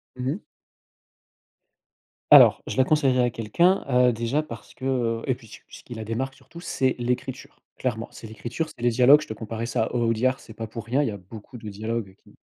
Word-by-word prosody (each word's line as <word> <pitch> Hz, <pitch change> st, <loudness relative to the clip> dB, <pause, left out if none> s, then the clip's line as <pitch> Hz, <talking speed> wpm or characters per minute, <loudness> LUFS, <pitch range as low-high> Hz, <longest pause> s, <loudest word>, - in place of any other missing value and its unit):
Mmh 125 Hz, 0 st, -3 dB
mh. -, -, -6 dB, 1.9 s
Alors: -, -, +8 dB
je -, -, -4 dB
la 130 Hz, -, +6 dB
conseillerais 135 Hz, -3 st, +3 dB
à 120 Hz, -, +2 dB
quelqu'un, 170 Hz, -, +2 dB
heu, 125 Hz, -1 st, +4 dB
déjà 120 Hz, +7 st, -1 dB
parce 115 Hz, -8 st, -11 dB
que, 130 Hz, -, -8 dB
heu 120 Hz, -4 st, 0 dB
et 130 Hz, -, +1 dB
puis 115 Hz, -2 st, -13 dB
ce 110 Hz, -, -11 dB
qui -, -, -36 dB, 0.2 s
ce -, -, -18 dB
qui 120 Hz, -, -9 dB
la 110 Hz, -, -5 dB
démarque 130 Hz, +5 st, -3 dB
surtout, 170 Hz, -, -14 dB
c'est 130 Hz, -7 st, 0 dB
l'écriture, 125 Hz, +2 st, -4 dB, 0.2 s
clairement. 115 Hz, -3 st, -2 dB
C'est 115 Hz, -, -10 dB
l'écriture, 120 Hz, +8 st, -4 dB
c'est 120 Hz, -, -12 dB
les 120 Hz, -, +3 dB
dialogues, 130 Hz, +5 st, +6 dB
je 155 Hz, -, -8 dB
te 110 Hz, -, -4 dB
comparais 110 Hz, +1 st, -5 dB
ça 110 Hz, -1 st, 0 dB
à -, -, -6 dB
Au 120 Hz, -, +1 dB
Audiard, 125 Hz, +3 st, +1 dB
c'est 110 Hz, -, -13 dB
pas 110 Hz, +1 st, -6 dB
pour 115 Hz, +1 st, -8 dB
rien, 130 Hz, +5 st, +1 dB
il 145 Hz, -, +1 dB
y -, -, -1 dB
a 100 Hz, -, -6 dB
beaucoup 105 Hz, +6 st, -12 dB
de 110 Hz, -2 st, -10 dB
dialogues 110 Hz, 0 st, -4 dB
qui -, -, -22 dB
120 Hz, 230 wpm, -25 LUFS, 115-130 Hz, 1.9 s, Alors